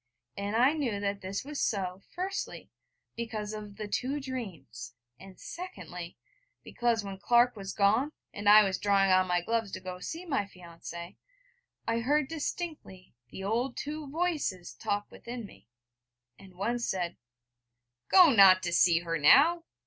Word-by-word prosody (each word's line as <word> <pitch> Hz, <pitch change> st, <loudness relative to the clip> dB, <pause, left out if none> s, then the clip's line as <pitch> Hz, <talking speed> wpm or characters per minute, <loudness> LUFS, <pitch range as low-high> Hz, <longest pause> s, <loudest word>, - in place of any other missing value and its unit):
And 200 Hz, +2 st, -3 dB
I 255 Hz, +5 st, +5 dB
knew 255 Hz, -10 st, -2 dB
that 200 Hz, 0 st, -2 dB
this 195 Hz, +5 st, -4 dB
was 295 Hz, 0 st, -4 dB
so, 190 Hz, -2 st, -1 dB
firstly, 375 Hz, +2 st, -4 dB, 0.4 s
because 220 Hz, -2 st, -4 dB
of 210 Hz, -1 st, -8 dB
the 215 Hz, -1 st, -5 dB
two 260 Hz, +7 st, -2 dB
dreams, 160 Hz, -, -7 dB, 0.2 s
and 190 Hz, -1 st, -13 dB
secondly, 180 Hz, -, -8 dB, 0.5 s
because, 235 Hz, -2 st, 0 dB
when 195 Hz, -1 st, -7 dB
Clark 240 Hz, +3 st, +4 dB
was 195 Hz, -2 st, -6 dB
gone, 220 Hz, +9 st, +2 dB, 0.2 s
and 205 Hz, 0 st, 0 dB
I 210 Hz, +1 st, +9 dB
was 190 Hz, -2 st, -1 dB
drawing 195 Hz, -1 st, +3 dB
on 185 Hz, 0 st, +4 dB
my 175 Hz, -1 st, +1 dB
gloves 225 Hz, +1 st, -1 dB
to -, -, -4 dB
go 185 Hz, -1 st, -7 dB
to -, -, -11 dB
see 335 Hz, +3 st, -6 dB
my 275 Hz, -, 0 dB
fiancée, 170 Hz, -1 st, -10 dB, 0.7 s
I 230 Hz, 0 st, +1 dB
heard 290 Hz, +4 st, +1 dB
distinctly 310 Hz, -, -5 dB, 0.2 s
the 190 Hz, -, -8 dB
old 240 Hz, +5 st, -1 dB
two 295 Hz, 0 st, -5 dB
Voices 300 Hz, -, -2 dB
talk 205 Hz, -1 st, -2 dB
within 235 Hz, -1 st, -7 dB
me: 105 Hz, -, -16 dB, 0.7 s
and 190 Hz, -2 st, -15 dB
One 230 Hz, +6 st, -1 dB
said: 180 Hz, -7 st, -2 dB, 0.9 s
'Go 360 Hz, -5 st, +8 dB
not 195 Hz, -5 st, +7 dB
to 175 Hz, -, -2 dB
see 170 Hz, -1 st, +4 dB
her 165 Hz, -1 st, -2 dB
now!' 320 Hz, -, +6 dB
205 Hz, 155 wpm, -30 LUFS, 185-255 Hz, 0.9 s, I